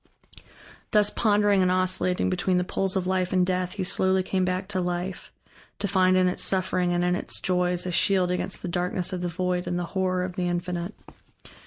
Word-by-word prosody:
Thus 210 -1 +3
pondering 205 -2 +3
and 185 - +3
oscillating 185 0 +1
between 185 0 +1
the 180 - +1
poles 190 +1 -2
of 190 -1 0
Life 185 -1 0
and 185 -1 +3
Death, 180 -1 -1
he 200 - -3
slowly 190 +1 +2
came 185 0 -1
back 185 +1 -1
to 190 -3 -1
life, 180 +1 -4 0.5
to 205 - -2
find 185 -1 +3
in 185 0 +4
its 180 - -1
suffering 185 -1 +1
and 175 0 +1
in 180 0 +2
its - - -4
joys 180 -1 0
a 180 - -2
shield 185 0 +2
against 180 +1 -4
the - - -3
darkness 180 +1 -1
of 180 - -3
the 180 - -1
void 180 +1 -2
and 175 - -1
the 175 - -2
horror 185 -1 0
of 180 -1 -6
the 180 -1 0
Infinite. 175 +2 -3
185 Hz, 205 wpm, -25 LUFS, 180-190 Hz, 0.5 s, in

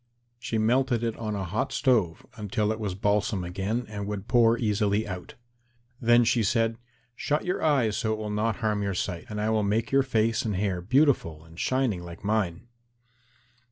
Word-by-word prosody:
She 115 -1 -3
melted 120 +2 +2
it 115 -1 -1
on 110 -2 -3
a 100 - -3
hot 95 +5 -2
stove 110 - +1
until 105 0 -1
it 110 - -3
was 100 -4 -3
balsam 105 -1 0
again 100 +7 -2
and 105 -1 -5
would 105 -1 -5
pour 115 -1 +4
easily 105 -1 0
out. 90 -2 -7 0.7
Then 120 0 +5
she 115 0 +2
said, 115 +2 +1 0.4
"Shut 150 +5 -1
your 180 - -1
eyes 130 -9 +2
so 110 - -1
that - - +2
it - - -8
will 105 -1 -4
not 110 +1 0
harm 105 -1 +1
your 100 -1 -2
sight, 90 -1 -3
and 105 -1 -4
I 110 +1 0
will 110 -1 +2
make 110 +3 0
your 135 0 +5
face 115 -4 +1
and 105 -3 -2
hair 95 -2 -1
beautiful 105 - +2
and 80 +1 -14
shining 130 -8 0
like 85 +1 -10
mine." 100 -4 -1
110 Hz, 190 wpm, -27 LUFS, 100-115 Hz, 0.7 s, Then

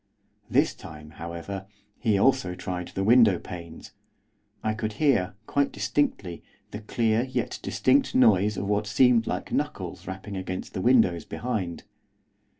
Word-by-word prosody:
This - - +3
time, 75 -1 -11
however, 85 +4 -7 0.3
he 110 -4 +2
also 100 -5 +2
tried 90 -1 -5
the 95 - -3
window 110 -3 +6
panes, 85 -2 -9 0.7
I 110 - 0
could 110 -1 -3
hear, 105 -9 +1
quite 140 +4 +1
distinctly, 95 - -1 0.3
the 105 - -6
clear, 110 +1 0
yet 130 - -3
distinct, 275 -2 +2
noise 105 - +4
of - - -2
what 105 0 0
seemed 120 0 +4
like - - -3
knuckles - - -3
rapping 95 +2 -6
against 95 -1 -5
the 95 - -3
windows 110 -8 +3
behind. 105 -8 -4
105 Hz, 140 wpm, -26 LUFS, 90-120 Hz, 0.7 s, window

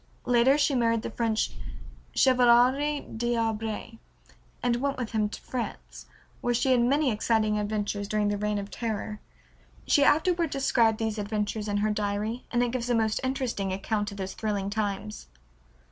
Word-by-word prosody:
Later 245 +3 +4
she 290 -1 +2
married 230 -3 +1
the - - -4
French 225 -1 0 0.6
Chevalier 260 +3 +4
D'Arblay, 225 -1 -2 0.6
and 245 -1 +2
went 275 +2 -1
with 245 -3 -4
him 215 -2 +1
to - - -8
France, 250 -2 -6 0.3
where 240 0 +1
she 260 +3 +2
had 250 -2 +4
many 275 +3 +2
exciting 215 -1 +1
adventures 205 -1 -2
during 210 0 +1
the 205 - -1
Reign 210 0 -1
of 200 0 -5
Terror. 215 -2 -4 0.7
She 285 - +4
afterward 335 +3 +3
described 235 -5 +2
these 220 -1 -2
adventures 210 +1 -2
in 205 0 0
her 215 - +1
diary 210 +3 -2
and 240 0 +1
it 240 - 0
gives 245 -1 -3
a 240 - +3
most 220 -1 +1
interesting 260 -7 -2
account 205 +2 -2
of 200 - -9
those 190 -1 -4
thrilling 200 -2 -2
times. 210 0 -3
225 Hz, 160 wpm, -27 LUFS, 210-245 Hz, 0.7 s, Later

